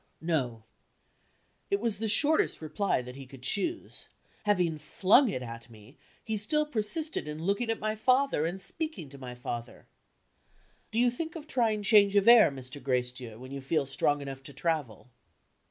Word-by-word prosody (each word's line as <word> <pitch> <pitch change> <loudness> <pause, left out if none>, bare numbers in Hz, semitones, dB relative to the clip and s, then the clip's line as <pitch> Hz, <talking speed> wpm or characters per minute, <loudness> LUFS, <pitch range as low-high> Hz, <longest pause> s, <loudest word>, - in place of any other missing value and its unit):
"No." 130 -9 -2 1.1
It 200 - +1
was 220 -2 -1
the 225 - -1
shortest 290 +9 +3
reply 155 -2 -1
that 125 +1 -9
he 135 -1 -10
could 130 -1 -14
choose. 320 - -2 0.4
Having 180 -6 +1
flung 215 - +4
it 130 -10 -3
at 115 0 -9
me, 110 +4 -16 0.3
he 220 -1 -2
still 300 +9 +3
persisted 300 - -2
in 150 +1 -6
looking 200 +6 0
at 225 - 0
my 215 0 -1
father 255 - +2
and 180 +3 -4
speaking 195 - -4
to 140 0 -13
my 125 -2 -8
father: 120 -1 -6 1.0
"Do 220 - -5
you 245 +1 +4
think 320 +7 -5
of 315 -3 -7
trying 225 -8 0
change 200 -1 +5
of 200 +1 +4
air, 235 -6 +9
Mr. 135 +1 -9
Gracedieu, 125 -3 -2
when 130 +2 -11
you 140 0 -5
feel 140 +2 0
strong 145 +2 +1
enough 135 -1 -7
to 140 +1 -11
travel?" 135 - -3
170 Hz, 170 wpm, -29 LUFS, 130-220 Hz, 1.1 s, air